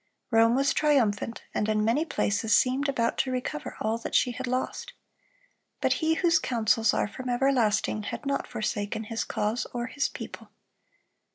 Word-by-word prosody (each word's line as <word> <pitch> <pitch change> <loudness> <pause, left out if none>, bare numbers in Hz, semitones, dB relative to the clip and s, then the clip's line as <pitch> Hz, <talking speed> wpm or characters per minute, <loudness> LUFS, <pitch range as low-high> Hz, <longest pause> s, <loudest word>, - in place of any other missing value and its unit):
Rome 225 +1 +5
was 275 +2 +2
triumphant, 235 -7 +1
and 210 - 0
in 215 0 +1
many 245 +8 +2
places 220 -7 +2
seemed 265 +3 +1
about 230 -4 0
to 260 - +1
recover 250 -12 -4
all 220 +2 -1
that - - -5
she 250 - +3
had 255 +2 -5
lost. 255 +1 -3 0.9
But - - +2
He 320 0 +2
whose 335 -1 +3
counsels 225 -2 +2
are - - 0
from 255 +5 -7
everlasting 240 -5 +2
had 290 - -5
not 275 0 -1
forsaken 215 0 -3
His 225 +1 -3
cause 215 +3 -2
or 240 0 -1
His 275 +2 -1
people. - - -9
240 Hz, 165 wpm, -27 LUFS, 220-270 Hz, 0.9 s, Rome